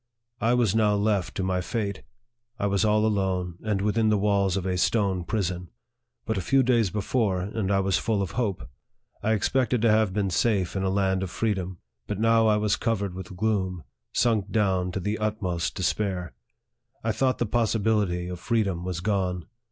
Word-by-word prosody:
I 115 +3 +2
was 120 -6 +2
now 105 -2 +3
left 100 -2 0
to 95 - -1
my 90 -1 0
fate. 100 0 -3 0.6
I 115 - -1
was 100 0 +1
all 105 0 +3
alone, 95 -4 -1
and 105 -3 -1
within 110 +1 +2
the 105 - +3
walls 100 -2 +2
of 95 - -3
a 95 -1 0
stone 95 -1 +1
prison. 90 -3 -2 0.6
But 110 -3 -1
a - - -2
few 135 +9 +3
days 120 -5 +3
before, 105 -1 0
and 100 +1 -2
I 100 -1 +3
was 95 -1 +1
full 105 -3 0
of 90 - -5
hope. 110 -5 -2 0.5
I 110 - +1
expected 125 +3 +1
to 115 - +5
have 110 -2 +3
been 100 -1 -1
safe 100 -2 +1
in 95 - 0
a 95 - 0
land 95 -1 +1
of 95 - -3
freedom; 95 -2 -2 0.3
but 105 -1 -3
now 115 0 +4
I 105 -1 +4
was 105 -1 +1
cov 115 -3 0
ered 100 -3 -3
with 95 0 -8
gloom, 95 -5 -1 0.3
sunk 110 -4 +1
down 95 -4 +1
to 95 - -2
the 105 +4 -2
utmost 95 -5 -2
despair. 95 -2 -1 0.7
I 115 - +1
thought 130 +4 +1
the 120 - 0
possibility 105 -5 +1
of 90 -1 -6
freedom 100 -5 0
was 90 -2 -3
gone. 90 -3 -1
100 Hz, 190 wpm, -26 LUFS, 95-110 Hz, 0.7 s, to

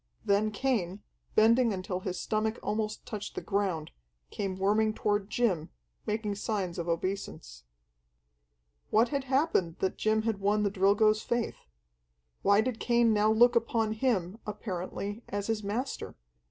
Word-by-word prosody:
Then 205 +2 +3
Cain, 205 -4 -1 0.3
bending 230 +2 +5
until 185 -1 -3
his 185 -1 -4
stomach 220 +1 -1
almost 215 0 -2
touched 210 -1 -6
the - - -2
ground, 190 -6 -1 0.4
came 195 -2 -3
worming 215 +3 +2
toward 205 -1 0
Jim, 195 -10 0 0.4
making 210 -1 -1
signs 200 -4 -2
of 170 - -3
obeisance. 165 - -4 1.2
What 230 +2 +4
had 280 -2 -2
happened 260 - +1
that 190 - -2
Jim 215 0 +2
had 220 -3 -1
won 205 +2 +2
the 200 - +1
Drilgo's 205 +2 +3
faith? 235 - -3 0.7
Why 200 +1 +5
did 235 -1 -2
Cain 235 -2 +3
now 210 +1 +3
look 240 +2 +5
upon 225 -1 +1
him, 220 -4 0
apparently, 205 +1 -4
as 205 0 -2
his 225 -1 -1
master? 230 +7 -3
210 Hz, 140 wpm, -30 LUFS, 195-225 Hz, 1.2 s, bending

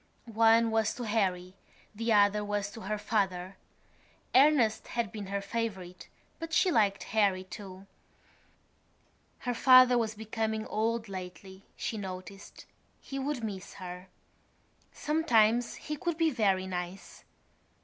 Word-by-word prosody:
One 225 0 +4
was 220 -1 +1
to 245 - -6
Harry; 185 -5 -1 0.4
the 230 +2 -2
other 210 0 +4
was 205 -1 -2
to 225 - -10
her 210 +2 -3
father. 195 -3 -1 0.8
Ernest 260 -5 +4
had 235 -5 -2
been 210 -3 -7
her 200 +1 -2
favourite 195 -5 -5 0.3
but 330 0 -6
she 365 +1 +3
liked 200 - +2
Harry 200 -4 +2
too. 190 0 -10 1.6
Her 245 - -2
father 255 0 +6
was 220 -1 -2
becoming 220 0 -3
old 225 +1 -1
lately, 190 +1 -9
she 220 - -4
noticed; 190 0 -9 0.3
he 275 - -6
would 270 -3 -3
miss 195 -4 -6
her. 180 -1 -8 0.8
Sometimes 245 -7 +2
he 305 - -5
could 345 -2 -2
be 325 -1 +2
very 195 -7 +1
nice. 180 0 -6
215 Hz, 130 wpm, -30 LUFS, 190-230 Hz, 1.6 s, father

